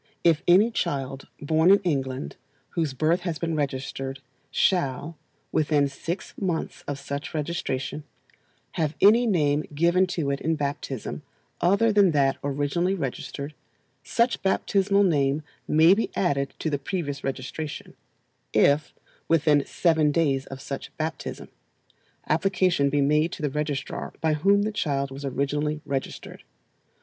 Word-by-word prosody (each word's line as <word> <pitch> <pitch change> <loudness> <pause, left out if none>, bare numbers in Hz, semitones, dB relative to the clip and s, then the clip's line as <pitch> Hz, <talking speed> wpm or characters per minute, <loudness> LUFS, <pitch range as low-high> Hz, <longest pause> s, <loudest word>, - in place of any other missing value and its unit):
If 165 -2 +4
any 195 +7 +6
child 135 - -3
born 160 +4 +3
in 200 - +8
England, 135 -6 -2 0.3
whose 160 -6 -2
birth 160 +6 +2
has 175 -3 -3
been 165 -1 -2
registered, 135 -1 -3 0.3
shall, 160 -3 0 0.4
within 150 -2 +2
six 165 +7 -5
months 175 -4 -2
of 145 - -3
such 140 +3 -5
registration, 150 -3 -3 0.7
have 155 -2 -1
any 230 +4 +6
name 150 -7 +2
given 175 +4 +3
to 160 -6 -1
it 140 - -3
in 160 +1 +1
baptism 140 -4 -4 0.4
other 200 +5 +3
than 200 -5 +5
that 135 -2 +2
originally 145 +7 0
registered, 140 -1 -5 0.5
such 235 +1 +1
baptismal 195 +1 +2
name 145 -4 +2 0.2
may 160 +4 +6
be 220 +3 0
added 140 -7 0
to 160 - -2
the 145 - 0
previous 145 -3 -4
registration, 135 +3 -5 0.6
if, 145 +1 +3 0.3
within 150 -3 +4
seven 160 -4 +2
days 140 -4 +1
of 135 0 -8
such 140 -1 -6
baptism, 160 +1 -4 0.8
application 175 -3 +2
be 145 +1 +1
made 150 +4 +2
to 155 - -7
the 145 - 0
registrar 150 -2 -3
by 160 -1 +1
whom 200 +7 +3
the 215 - -1
child 140 -9 -1
was 135 +2 -8
originally 145 +3 -1
registered. 135 -1 -5
150 Hz, 135 wpm, -25 LUFS, 140-175 Hz, 0.8 s, in